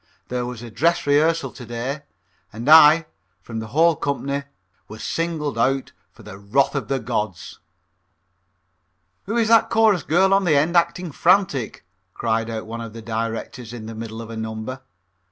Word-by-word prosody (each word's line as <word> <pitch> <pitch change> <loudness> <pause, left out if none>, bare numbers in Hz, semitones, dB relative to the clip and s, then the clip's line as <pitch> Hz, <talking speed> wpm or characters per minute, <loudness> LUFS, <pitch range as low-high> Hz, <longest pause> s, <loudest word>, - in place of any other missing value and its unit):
There 125 -1 -2
was 125 -1 -7
a 120 - -9
dress 170 +8 +1
rehearsal 145 -1 +2
to 125 - -11
day, 120 +5 -4 0.5
and 115 +4 -7
I, 155 +1 +8 0.4
from 115 -1 -6
the 110 - -6
whole 160 +7 +3
company, 140 0 -3 0.4
was 110 0 -10
singled 155 -6 -2
out 135 +2 +1 0.2
for - - -17
the 100 -1 -10
wrath 110 +8 +1
of 140 - -3
the 135 - 0
gods. 110 -7 -4 1.7
"Who 225 +4 -1
is 230 -2 +2
that 230 0 +5
chorus 220 -6 +3
girl 190 +7 +3
on 195 0 +3
the 165 -5 +3
end 155 +5 +2
acting 170 0 +1
frantic?" 165 - +1 0.3
cried 115 0 -1
out 110 -1 -5
one 115 +1 -6
of 115 -2 -8
the 115 -1 -9
directors 115 +2 -4
in 115 -3 -8
the 115 - -7
middle 115 0 -7
of 115 - -10
a - - -6
number. 110 +4 -5
135 Hz, 170 wpm, -22 LUFS, 115-165 Hz, 1.7 s, I